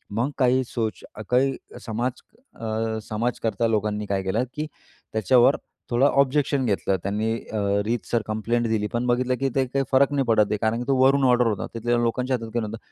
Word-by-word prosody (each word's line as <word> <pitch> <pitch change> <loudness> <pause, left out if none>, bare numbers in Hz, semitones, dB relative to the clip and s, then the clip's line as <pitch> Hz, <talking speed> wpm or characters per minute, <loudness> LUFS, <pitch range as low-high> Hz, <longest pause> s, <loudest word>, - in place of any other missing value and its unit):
मग 125 +6 0
काही 130 -1 +3
सोच, 115 -2 -3 0.3
काही 135 +2 +3 0.3
समाज 120 +3 -1 0.5
अ, 110 0 -2
समाजकर्ता 115 0 -1
लोकांनी, 105 -1 -1
काय 95 -1 -1
केलं 105 +6 0
की 150 - -2 0.5
त्याच्यावर 120 +5 +4 0.3
थोडं 120 +3 +3
ऑब्जेक्शन 140 0 +2
घेतलं. 100 -3 0
त्यांनी 105 +3 -1 0.2
अ, 110 - -2 0.3
रीतसर 115 0 -1
कंप्लेंट 115 +2 0
दिली 105 -2 0
पण 120 +1 0
बघितलं 125 +1 +1
की 135 0 +1
ते 135 - +2
काही 135 +1 -1
फरक 140 +1 +4
नाही 140 -2 +1
पडत 110 -3 +4
आहे 105 - +1
कारण 110 +1 +1
की - - -2
तो 135 - +3
वरून 135 +1 +4
ऑर्डर 125 -1 +4
होता, 105 -3 -2
तिथल्या 120 +1 0
लोकांच्या 125 +2 0
हातात 115 -1 -8
काही 120 - 0
नव्हतं. 110 - -6
120 Hz, 185 wpm, -24 LUFS, 110-130 Hz, 0.5 s, त्याच्यावर